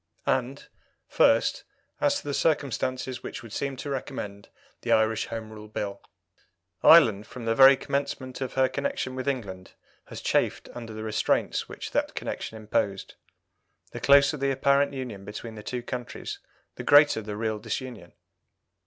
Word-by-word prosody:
And, - - -1 0.4
first, - - +3 0.4
as 285 -1 +2
to - - -14
the 145 - -1
circumstances 130 -4 -1
which - - -7
would 115 -3 -11
seem 140 +2 -2
to 145 - -6
recommend 105 -7 -5 0.3
the - - -2
Irish 110 0 +2
Home 110 -1 -6
Rule 105 -1 -10
Bill. 100 -2 -5 0.8
Ireland, 105 -2 +7
from 125 -2 -9
the 115 - +2
very 135 +2 +8
commencement 140 -2 -3
of 130 - -3
her 130 0 +3
connection 275 - -3
with 130 +1 -5
England, 100 -9 -4 0.3
has - - -8
chafed - - 0
under 115 -2 -8
the 110 0 -6
restraints 110 -1 0
which - - -7
that - - -1
connection 110 - -5
imposed. 105 -2 -2 0.8
The - - -6
closer 140 +2 +5
the 140 0 0
apparent 140 +1 +3
union 125 -8 -6
between 110 +3 -7
the 110 - -9
two 120 +3 -5
countries 125 -1 -6 0.4
the - - -5
greater 145 -5 +6
the 105 -1 -6
real 110 -1 -2
disunion. 115 -4 -6
120 Hz, 155 wpm, -27 LUFS, 110-135 Hz, 0.8 s, very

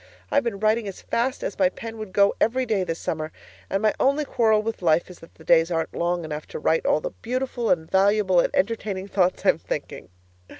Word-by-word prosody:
I've 285 - +3
been 230 -4 -2
writing 215 +1 +1
as 195 - -7
fast 255 +3 -1
as 205 - -4
my 185 -2 +4
pen 225 +3 -8
would 215 -3 -7
go 200 +1 +4
every 255 +4 +2
day 215 -5 0
this 165 -2 -3
summer, 155 -1 -4 0.4
and 195 +2 -1
my 215 - +3
only 280 +3 +2
quarrel 220 -5 +2
with 225 -1 -4
life 170 +1 +2
is 180 - -14
that 165 - -16
the 160 - -16
days 165 +1 +4
aren't 165 -2 -2
long 175 0 -1
enough 150 -1 -6
to - - -7
write 160 +1 +1
all 155 - +3
the - - -4
beautiful 250 -1 -2
and 160 - +1
valuable 195 -1 +3
and - - +3
entertaining 200 -2 -1
thoughts 185 -2 0
I'm - - +4
thinking. - - -6
195 Hz, 220 wpm, -24 LUFS, 170-225 Hz, 0.4 s, my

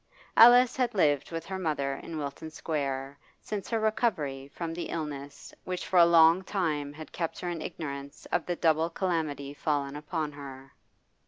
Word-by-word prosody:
Alice 245 +1 +8
had 245 -4 0
lived 145 -7 +2
with 165 0 -4
her 190 +1 -4
mother 145 -6 -1
in 160 +4 -7
Wilton 145 +2 -5
Square 140 -3 -3 0.2
since 210 -2 -5
her 230 - +1
recovery 160 - 0
from 165 +3 -5
the 175 - -5
illness 145 -3 -6
which 180 -1 -4
for 185 - +3
a 170 - +8
long 165 +1 +6
time 155 -7 -1
had 155 +2 -10
kept 165 -1 -3
her 180 - -3
in 165 -2 -4
ignorance 140 -3 -6
of 175 - 0
the 175 - 0
double 160 -1 +2
calamity 160 -6 -2
fallen 145 -1 -1
upon 155 0 -3
her. 135 -2 -10
160 Hz, 170 wpm, -29 LUFS, 140-175 Hz, 0.2 s, Alice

